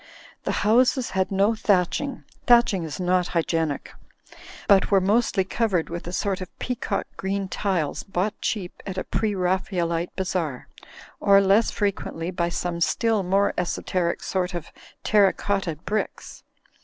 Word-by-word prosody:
The - - 0
houses 245 +3 +3
had 190 0 0
410 205 +3 +1
thatching 205 +8 +1 0.2
(thatching 235 -7 +5
is 155 -1 -6
not 180 0 +2
hygienic) 160 -3 -1 0.7
but 195 -2 +5
were 195 - +5
mostly 200 +1 +2
covered 190 -4 -1
with 170 0 -5
a - - -4
sort 190 +1 -1
of 185 - -6
peacock 240 -5 -2
green 195 0 -2
tiles 185 -7 -1
bought 195 +2 -2
cheap 190 -5 -3
at 190 -1 -5
a - - -1
Preraphaelite 180 -4 -1
Bazaar; 180 -8 -2 0.5
or, 200 0 +6
less 200 +3 +4
frequently, 185 -4 -2
by 170 -1 -1
some 170 0 -3
still 225 +4 +2
more 195 +2 +2
esoteric 175 0 -1
sort 185 -1 -2
of 170 - -6 0.3
terra 205 -2 +4
cotta 195 -5 -2
bricks. 200 +8 -4
190 Hz, 140 wpm, -24 LUFS, 175-205 Hz, 0.7 s, or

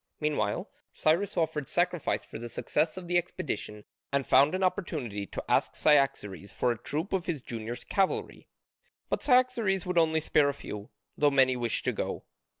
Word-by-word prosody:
Meanwhile 145 -10 -1 0.2
Cyrus 170 +6 +1
offered 155 -4 -1
sacrifice 175 -2 0
for - - -8
the 120 +1 -6
success 155 +7 0
of 180 -2 -7
his 175 0 +3
expedition 155 - -5 0.3
and 140 -1 +1
found 140 +6 +5
an 190 - -1
opportunity 140 - -2
to - - -6
ask - - +2
Cyaxares 120 - +2
for 125 - +1
a 120 - -2
troop 160 +7 -3
of 185 -2 -1
his 155 -7 -2
junior 115 0 -5
cavalry. 190 +8 -1 0.6
But - - -1
Cyaxares 250 - +3
would 180 -1 +2
only 160 -1 +3
spare 150 -2 +3
a 140 - -3
few, 105 -3 -8 0.3
though 145 - +4
many 130 -2 +4
wished 120 -2 -1
to - - +2
go. - - -4
150 Hz, 170 wpm, -29 LUFS, 120-180 Hz, 0.6 s, found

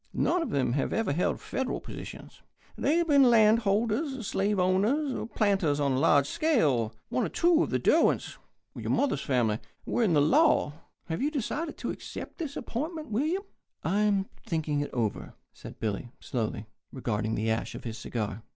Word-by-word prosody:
None 360 - +2
of 330 - -2
them 130 -3 0
have 140 - -1
ever 225 -10 0
held 175 - 0
Federal 265 -1 -3
positions. - - -10 0.3
They 300 - +1
have 340 -1 +1
been 280 -4 +6
land 220 -1 +6
holders, 230 +5 0
slave 200 +1 0
owners, 205 +11 +2
and 230 - -5
planters 190 -9 +2
on 140 -1 +1
a 130 - +1
large 145 -2 +4
scale. 140 - +1
One 125 - 0
of - - -3
two 340 -1 +4
of - - 0
the - - +1
Derwents - - +2 0.4
your - - -5
mother's 270 - +1
family 115 -5 +1 0.3
were - - 0
in 195 -8 +3
the - - +5
law. 255 - +4 0.3
Have 160 +5 -3
you 285 - +2
decided 305 +3 -3
to - - -3
accept - - -8
this 305 -4 -4
appointment, 305 +6 -4
William?" 310 - 0 0.4
"I 200 - +1
am 205 -2 +2 0.2
thinking 155 -3 -1
it 145 - -2
over," 105 -10 -3 0.2
said - - -11
Billy, 110 +2 -3
slowly, 110 -3 -3 0.3
regarding 110 -4 -2
the 110 +1 0
ash 110 - -2
of - - -8
his 115 -2 -6
cigar. 110 -2 -4
195 Hz, 180 wpm, -28 LUFS, -, 0.4 s, been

